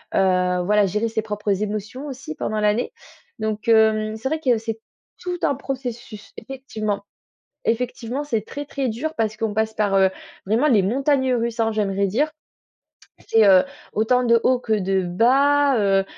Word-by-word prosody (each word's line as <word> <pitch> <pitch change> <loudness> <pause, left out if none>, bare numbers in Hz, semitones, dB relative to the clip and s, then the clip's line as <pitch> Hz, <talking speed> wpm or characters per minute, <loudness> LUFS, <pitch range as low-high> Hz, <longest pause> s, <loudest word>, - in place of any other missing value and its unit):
heu, 180 -1 +2
voilà 210 +1 +3
gérer 210 +4 -1
ses 220 -1 -1
propres 210 -2 -2
émotions 215 +7 -5
aussi 275 +3 -7
pendant 215 -7 -2
l'année. 210 +3 0 0.5
Donc, 215 0 -3
hem, 220 -1 +3
c'est 225 +4 -3
vrai 315 +1 -1
que 250 -6 +2
c'est 225 0 -5 0.4
tout 360 -1 -4
un 280 - +3
processus 245 -6 -6
effectivement. 220 -5 -4 0.6
Effectivement, 245 +3 -2
c'est 230 -7 -1
très, 290 - -6
très 275 -2 -3
dur 275 +8 -3
parce 215 -1 0
qu'on 220 -1 -2
passe 220 0 0
par, 210 -2 0
heu, 190 -1 +5 0.4
vraiment 230 +9 +2
les 215 -8 +4
montagnes 260 +4 +1
russes, 235 0 -2
hein, 225 0 +2
j'aimerais 200 -2 0
dire. 285 +11 0 1.0
C'est, 220 -2 +5
heu, 185 -2 +7 0.3
autant 250 +4 +2
de 235 -1 +4
hauts 255 -1 +3
que 225 -3 -1
de 195 -2 +1
bas, 270 +8 +3
heu, 195 -1 +3
220 Hz, 165 wpm, -22 LUFS, 210-260 Hz, 1.0 s, heu